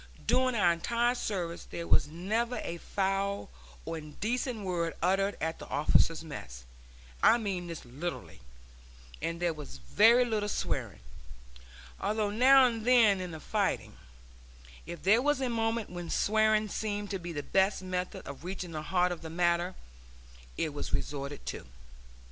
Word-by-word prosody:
During 255 0 +3
our 180 -5 +4
entire 235 +8 +1
service 180 -8 -3
there 170 - -5
was - - +4
never 215 +10 -1
a 170 - -4
foul 195 - -1 0.3
or 165 - -4
indecent 215 - -3
word 170 -3 -1
uttered 195 +3 +1
at 160 +1 -2
the - - -9
officers' 160 +2 +2
mess 60 - -8 0.6
I 235 - +6
mean 195 -6 -3
this 165 -5 -7
literally; 145 - -6 0.8
and 165 0 -2
there 175 -1 +1
was 150 - -9
very 225 - +5
little 215 -3 -1
swearing - - -3 1.0
although 210 0 0
now 260 +4 +7
and 230 -3 -1
then 225 -6 +5
in 180 - -4
the 160 -2 -7
fighting, - - -1 0.9
if 170 -3 -7
there 210 +6 +5
was 290 0 +2
a 260 -2 0
moment 225 -2 -1
when 175 -1 -6
swearing 215 0 +3
seemed 205 -1 -3
to 195 - -2
be 175 0 -6
the 145 -3 -4
best 190 +2 +2
method 185 0 -4
of 140 +2 -8
reaching 185 -1 -5
the 155 -1 -4
heart 180 +2 +1
of 175 - -5
the 160 - -7
matter, 175 +2 +1 0.8
it 155 - -1
was 145 - -5
resorted 140 0 -4
to. - - -6
185 Hz, 155 wpm, -30 LUFS, 165-220 Hz, 1.0 s, now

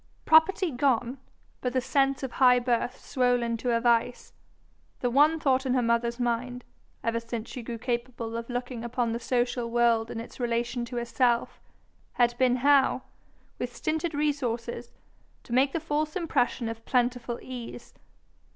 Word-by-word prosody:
Property 320 +3 +4
gone, 250 -1 0 0.4
but 250 -1 -2
the 260 - +2
sense 270 +1 +1
of 265 - -3
high 250 -1 +5
birth 245 +1 -1
swollen 245 -2 0
to 245 +2 -3
a 230 -1 +2
vice, 235 0 +1 0.7
the 245 - 0
one 300 +5 +4
thought 265 -3 +2
in 260 -1 0
her 250 - +3
mother's 235 +1 0
mind, 245 +1 -2 0.4
ever 230 0 0
since 230 -1 -6
she 250 - -6
grew 235 0 -6
capable 235 -1 -3
of 230 +1 -5
looking 245 -1 -4
upon 235 0 -1
the 230 - -2
social 245 -1 -1
world 235 -1 +2
in 225 - -5
its 230 - -10
relation 240 0 -1
to 245 +1 -8
herself, 240 0 0 0.5
had 240 -1 +2
been 255 -1 +4
how, 285 -2 +4 0.6
with 245 0 -4
stinted 315 0 -2
resources, 245 -5 -2 0.5
to 235 - -8
make 265 +2 +3
the 330 - -1
false 305 -1 -2
impression 275 -9 0
of 225 0 -6
plentiful 245 -1 0
ease. 250 -2 -8
245 Hz, 160 wpm, -27 LUFS, 235-265 Hz, 0.7 s, high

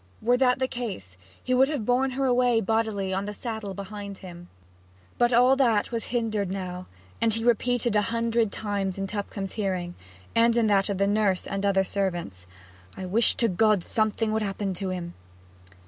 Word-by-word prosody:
Were 245 +3 +3
that 250 -1 +3
the 260 - 0
case, 200 - -6 0.3
he 255 - 0
would 265 +2 +4
have 285 -8 -2
borne 255 +3 +2
her 275 - +1
away 245 -2 +3
bodily 220 -3 0
on 195 +1 -1
the 210 0 -5
saddle 220 -5 -5
behind 200 0 -7
him. 175 -2 -11 0.7
But 240 0 +4
all 250 +2 +5
that 235 -6 +2
was 230 -1 -2
hindered 220 -5 -1
now, 185 -1 -5 0.3
and 230 - +3
he 225 +1 -2
repeated 240 -1 +1
a 210 - +4
hundred 230 0 0
times 200 -3 -2
in 195 - -2
Tupcombe's 200 -1 -4
hearing, 185 -4 -2 0.4
and 230 0 +4
in 235 - +3
that 200 -1 +3
of 200 - -1
the 200 - +2
nurse 200 -2 +1
and 195 0 -3
other 195 -1 +3
servants, 175 - -3 0.5
'I 190 - -5
wish 215 +6 +3
to 235 - +2
God 210 -1 +2
something 220 +1 0
would 220 0 0
happen 200 -1 -2
to 190 +1 -4
him!' 175 -2 -5
210 Hz, 185 wpm, -26 LUFS, 195-235 Hz, 0.7 s, all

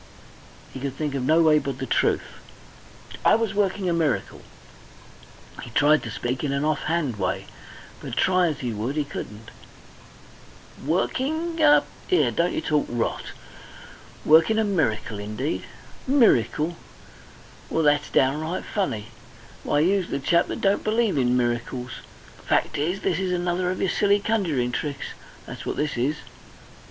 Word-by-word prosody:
He - - -6
could 135 0 -4
think 150 -1 -3
of 135 - -2
no 160 +6 +4
way 155 -1 +5
but 140 -3 -4
the 130 - -4
truth. - - +1 1.0
"I - - +6
was 225 -2 -1
working 200 -1 0
a 175 - +2
miracle." 160 -6 -1 1.2
He - - -8
tried 145 +6 +4
to 115 - -6
speak 120 +4 -3
in 145 - 0
an 140 +2 0
off 155 -2 0
hand 155 -8 -1
way, 95 0 -2 0.6
but - - -6
try 185 -1 +3
as 150 -2 -3
he 120 -3 -2
would 115 +7 -3
he 150 - +1
couldn't. 110 -5 -8 1.3
"Working 315 - -1
a! 295 -1 +6 0.3
'Ere, 365 - +3
don't 170 +1 +1
you - - -1
talk 150 -2 0
rot. 120 -1 -2 1.0
Working 160 +8 +5
a 220 - +3
miracle, 130 - -1
indeed! 110 +9 -3 0.4
Miracle! 175 - +3 0.9
Well, 160 - 0
that's 145 0 +2
downright 155 +6 +1
funny! 115 - -2 0.5
Why, 145 - +1
you's 185 +2 +2
the - - -1
chap 170 +5 +2
that - - -5
don't 195 0 +2
believe 220 -2 +1
in 125 -2 +2
miracles... 125 +1 -2 0.5
Fact - - +1
is, 175 +6 -1
this 180 -2 0
is 190 -1 -1
another 180 0 0
of 185 - -3
your 190 - +1
silly 205 0 +3
conjuring 175 - 0
tricks 140 +2 -4 0.4
that's - - -8
what - - -3
this 150 0 -1
is. 130 +5 0
155 Hz, 155 wpm, -24 LUFS, 130-185 Hz, 1.3 s, I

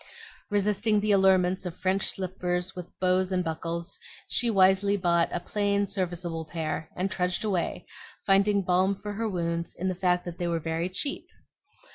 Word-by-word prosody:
Resisting 205 +1 +2
the 210 +1 +1
allurements 190 -1 +4
of 180 -1 -6
French 190 +1 +1
slippers 180 -1 -2
with 180 -1 -6
bows 185 0 +2
and 180 -1 +1
buckles, 165 +1 -4 0.3
she 240 - +1
wisely 195 0 +4
bought 170 -3 +2
a - - -1
plain, 200 +2 0
serviceable 175 -4 -3
pair, 160 -1 -4
and 185 +2 -1
trudged 180 +2 -1
away, 190 -5 -1 0.4
finding 200 0 +3
balm 185 +2 +2
for 205 0 -5
her 225 +2 -2
wounds 170 -2 -2
in 185 +2 -1
the - - 0
fact 180 -1 +1
that 175 -1 -7
they 175 - -1
were 170 -1 0
very 165 +2 -2
cheap. 200 +10 -3
185 Hz, 165 wpm, -27 LUFS, 175-200 Hz, 0.4 s, allurements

